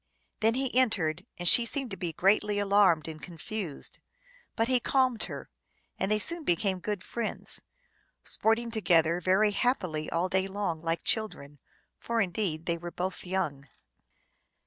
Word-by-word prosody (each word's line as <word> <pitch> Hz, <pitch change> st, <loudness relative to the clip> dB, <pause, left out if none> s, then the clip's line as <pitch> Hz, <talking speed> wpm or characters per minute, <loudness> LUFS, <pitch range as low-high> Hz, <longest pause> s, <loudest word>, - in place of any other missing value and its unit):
Then 225 Hz, +1 st, +3 dB
he 260 Hz, -2 st, -1 dB
entered, 185 Hz, -9 st, +1 dB
and 175 Hz, -, -1 dB
she 240 Hz, -, +9 dB
seemed 260 Hz, 0 st, -4 dB
to -, -, -4 dB
be 175 Hz, -2 st, -4 dB
greatly 205 Hz, +4 st, +2 dB
alarmed 200 Hz, -6 st, +3 dB
and 155 Hz, -1 st, -8 dB
confused; 175 Hz, -1 st, -4 dB, 0.6 s
but 225 Hz, 0 st, +1 dB
he 255 Hz, -1 st, +3 dB
calmed 255 Hz, -2 st, +1 dB
her, -, -, -8 dB, 0.5 s
and 190 Hz, -, 0 dB
they 215 Hz, -, +3 dB
soon 335 Hz, +9 st, 0 dB
became 190 Hz, -, 0 dB
good 205 Hz, 0 st, -4 dB
friends, 235 Hz, -2 st, -5 dB, 0.6 s
sporting 230 Hz, +2 st, 0 dB
together 170 Hz, -5 st, +2 dB
very 195 Hz, +4 st, +3 dB
hap 245 Hz, +5 st, +1 dB
pily 155 Hz, -4 st, -4 dB
all 170 Hz, +2 st, 0 dB
day 190 Hz, +1 st, 0 dB
long 190 Hz, -5 st, -3 dB
like 165 Hz, 0 st, -2 dB
children, 145 Hz, -10 st, -2 dB, 0.4 s
for 235 Hz, 0 st, -2 dB
indeed 180 Hz, -5 st, -1 dB
they 170 Hz, -1 st, -1 dB
were 175 Hz, +1 st, -6 dB
both 180 Hz, +1 st, -5 dB
young. 150 Hz, -7 st, -2 dB
190 Hz, 155 wpm, -29 LUFS, 170-220 Hz, 0.6 s, she